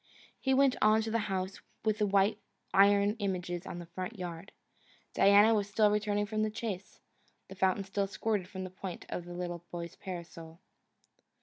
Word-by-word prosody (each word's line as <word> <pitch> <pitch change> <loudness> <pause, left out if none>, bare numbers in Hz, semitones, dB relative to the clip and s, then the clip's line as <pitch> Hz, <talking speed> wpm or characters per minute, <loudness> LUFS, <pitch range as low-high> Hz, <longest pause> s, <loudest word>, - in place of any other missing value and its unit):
He 265 -1 +2
went 270 -1 +4
on 215 +1 +5
to 220 - -3
the 230 - +2
house 190 0 -3 0.2
with 215 -1 +1
the 210 - +2
white 200 +2 +3 0.3
iron 200 +1 +5
images 180 -3 -3
in - - -5
the 175 - -7
front 185 +6 -6
yard. 175 0 -6 0.6
Diana 205 +3 +6
was 205 -2 0
still 210 0 +4
returning 205 0 +1
from 215 +1 -2
the 215 - +1
chase. 210 -4 -5 0.5
The - - -8
fountain 190 +1 +1
still 195 +1 -1
squirted 200 -1 -1
from 190 -1 -6
the 185 - -6
point 185 -1 -7
of 175 - -4
the 175 - -8
little 175 -1 -4
boy's 170 -1 -6
parasol. 170 -3 -8
195 Hz, 180 wpm, -31 LUFS, 180-210 Hz, 0.6 s, Diana